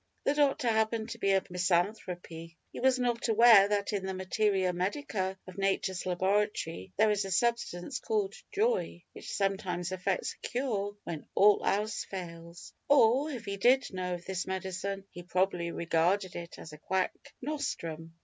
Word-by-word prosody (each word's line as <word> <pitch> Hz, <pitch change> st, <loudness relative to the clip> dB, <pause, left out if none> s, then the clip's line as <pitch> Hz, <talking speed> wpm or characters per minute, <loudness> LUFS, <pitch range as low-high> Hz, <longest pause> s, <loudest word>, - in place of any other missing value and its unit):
The 280 Hz, -, +2 dB
doctor 285 Hz, -3 st, +2 dB
happened 220 Hz, 0 st, 0 dB
to 230 Hz, -, -7 dB
be 195 Hz, -, +1 dB
a 195 Hz, -1 st, +3 dB
misanthrope. 180 Hz, +1 st, 0 dB
He 165 Hz, 0 st, -10 dB, 0.2 s
was 260 Hz, 0 st, +2 dB
not 245 Hz, -2 st, 0 dB
aware 225 Hz, -3 st, +7 dB
that 205 Hz, 0 st, -1 dB
in 200 Hz, -2 st, -1 dB
the 190 Hz, 0 st, -3 dB
Materia 190 Hz, -1 st, +1 dB
Medica 190 Hz, 0 st, -2 dB
of 185 Hz, +1 st, -10 dB
Nature's 190 Hz, -2 st, 0 dB
laboratory 185 Hz, -, 0 dB
there 220 Hz, -, +4 dB
is 205 Hz, -1 st, +1 dB
a 195 Hz, -, -5 dB
substance 235 Hz, +2 st, 0 dB
called 420 Hz, -, -1 dB, 0.2 s
"joy," 455 Hz, +3 st, 0 dB
which -, -, -8 dB
sometimes 190 Hz, -3 st, -1 dB
effects 185 Hz, 0 st, -1 dB
a -, -, -2 dB
cure 210 Hz, -6 st, -2 dB
when 160 Hz, -3 st, -6 dB
all 205 Hz, +1 st, +5 dB
else 210 Hz, +2 st, 0 dB
fails 170 Hz, -2 st, -8 dB, 0.2 s
or, 275 Hz, +1 st, +5 dB
if 245 Hz, -6 st, -6 dB
he 200 Hz, 0 st, -3 dB
did 250 Hz, +3 st, +3 dB
know 180 Hz, -1 st, -2 dB
of 175 Hz, -, -10 dB
this 190 Hz, -1 st, -3 dB
medicine, 190 Hz, +1 st, -3 dB
he 175 Hz, -, -9 dB
probably 180 Hz, -1 st, 0 dB
regarded 170 Hz, +4 st, +1 dB
it 170 Hz, 0 st, -7 dB
as 160 Hz, -, -10 dB
a 150 Hz, -, -11 dB
quack 190 Hz, +3 st, 0 dB, 0.3 s
nostrum. 165 Hz, -, -4 dB
195 Hz, 165 wpm, -30 LUFS, 180-225 Hz, 0.3 s, aware